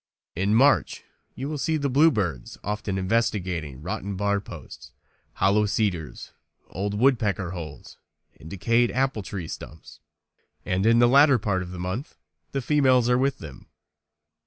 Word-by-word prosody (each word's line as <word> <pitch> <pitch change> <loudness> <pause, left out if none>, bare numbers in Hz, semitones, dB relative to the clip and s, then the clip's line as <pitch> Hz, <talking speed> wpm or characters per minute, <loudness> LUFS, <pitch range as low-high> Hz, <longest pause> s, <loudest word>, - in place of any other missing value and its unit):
In 100 +4 +1
March 135 +4 +3 0.3
you 135 +3 -5
will 150 -1 -4
see 160 +3 0
the 140 -2 -1
bluebirds 115 - +1
often 105 -1 -3
investigating 95 - -1
rotten 95 +3 -4
bar 100 +1 0
posts, - - -11 0.4
hollow 105 +2 +2
cedars, 95 -7 -2 0.4
old 100 +2 -3
woodpecker 105 -7 +1
holes, 85 -5 -9 0.4
and 80 - -11
decayed 115 +6 +1
apple 130 -3 0
tree 95 -4 -6
stumps. 75 -1 -10 0.7
And 95 +3 0
in 115 +1 +5
the 120 0 +6
latter 140 +1 +6
part 100 -4 -1
of 90 - -7
the 90 - -8
month 95 - -5 0.3
the 135 -2 -3
females 130 -4 +3
are 125 - +4
with 135 +1 +1
them. 80 -4 -11
105 Hz, 145 wpm, -25 LUFS, 90-125 Hz, 0.7 s, the